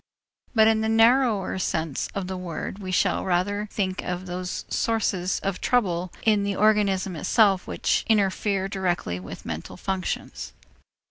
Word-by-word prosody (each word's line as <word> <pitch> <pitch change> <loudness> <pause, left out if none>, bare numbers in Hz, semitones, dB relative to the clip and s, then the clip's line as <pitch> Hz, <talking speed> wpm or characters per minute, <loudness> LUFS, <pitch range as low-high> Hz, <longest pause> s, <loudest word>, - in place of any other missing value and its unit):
But 220 -1 +6
in 220 0 +3
the 220 - 0
narrower 225 -4 +3
sense 160 -4 -1
of 195 -2 -2
the 190 +1 -4
word, 180 +2 -5
we 185 -2 -5
shall 185 - +1
rather 205 +3 0
think 185 -3 -2
of 180 0 -4
those 180 0 -4
sources 195 -5 0
of 195 -2 -2
trouble 185 -7 +1
in 215 -2 +3
the 200 0 -1
organism 200 -3 +2
itself 195 +4 +3
which - - 0
interfere 200 -2 +1
directly 175 - -2
with 90 - -9
the - - -11
mental - - -6
functions. 190 -1 -4
195 Hz, 150 wpm, -25 LUFS, 180-210 Hz, -, But